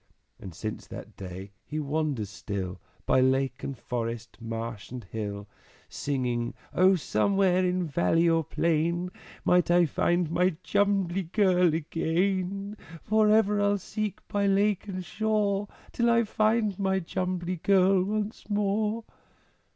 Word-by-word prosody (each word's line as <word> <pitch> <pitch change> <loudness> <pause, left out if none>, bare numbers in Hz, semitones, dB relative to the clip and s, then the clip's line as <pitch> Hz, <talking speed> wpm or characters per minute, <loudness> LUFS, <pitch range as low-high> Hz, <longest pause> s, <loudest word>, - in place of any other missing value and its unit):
And 90 -4 -9
since 110 +4 -5
that - - -9
day 95 +1 -8
he 155 - -4
wanders 145 -8 -2
still 95 +1 -5 0.2
By 130 - +4
lake 130 0 +1
and 135 - -4
forest, 115 -1 -4
marsh 115 -2 -5
and 125 -1 -7
hill, 100 0 -5 0.4
Singing, 125 -4 -2 0.2
"O 185 +1 +5
somewhere, 185 - +2
in 180 0 +1
valley 155 - +2
or 165 -1 +3
plain, 170 +3 0 0.3
Might 180 -1 +4
I 175 0 +5
find 175 +2 +1
my 180 0 +2
Jumbly 195 -3 +1
Girl 180 -5 +4
again! 185 +5 -1 0.3
For 215 0 +3
ever 210 -1 +4
I'll 205 0 +3
seek 210 +1 -5
by 205 -1 0
lake 200 0 +2
and 185 -2 -5
shore 210 -1 0 0.2
Till 235 0 +1
I 235 0 +4
find 215 -2 +1
my 190 -1 +1
Jumbly 180 0 -2
Girl 190 +1 +4
once 215 +3 -3
more!" 210 +2 0
180 Hz, 135 wpm, -28 LUFS, 135-200 Hz, 0.4 s, O